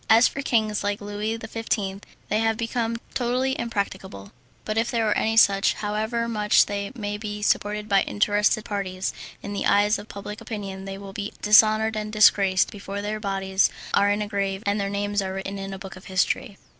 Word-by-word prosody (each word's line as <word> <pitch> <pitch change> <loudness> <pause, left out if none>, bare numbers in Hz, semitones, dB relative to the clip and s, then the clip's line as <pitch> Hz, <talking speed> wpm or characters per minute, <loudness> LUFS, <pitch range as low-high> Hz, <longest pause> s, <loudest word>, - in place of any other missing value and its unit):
As 225 +2 +7
for 275 - -4
kings 215 -6 0
like 205 0 -1
Louis 205 +2 -3
XV., 220 -3 -3 0.3
they 215 - +1
have 225 -1 +1
become 230 0 -1 0.2
totally 255 +2 0
impracticable; 200 - -4 0.3
but 215 - -2
if 225 +1 +1
there 230 -2 0
are 210 - +2
any 225 0 +1
such, 195 -3 +5
however 220 +3 -2
much 210 -2 +3
they 200 0 -4
may 205 -3 -4
be 210 -1 -5
supported 210 +1 0
by 195 -2 +4
interested 210 +1 +1
parties, 195 -3 -3 0.3
in 205 - -5
the 200 - -1
eyes 205 +1 +3
of 205 - -10
public 205 +1 -7
opinion 195 -4 -6
they 195 0 -6
will 195 -1 -9
be 205 +1 -5
dishonoured 215 +1 +5
and 215 0 -3
disgraced 200 -3 +4
before 200 0 -6
their 215 +1 -3
bodies 195 -1 +1 0.2
are 200 0 +4
in 205 +1 +1
a - - -5
grave 200 -1 -2
and 200 0 +1
their 195 - -1
names 205 0 -1
are 190 -1 -3
written 195 +1 -5
in 195 0 -5
the 195 - -6
book 190 -1 -9
of 185 - -13
history. 195 +4 -1
205 Hz, 195 wpm, -24 LUFS, 200-220 Hz, 0.3 s, As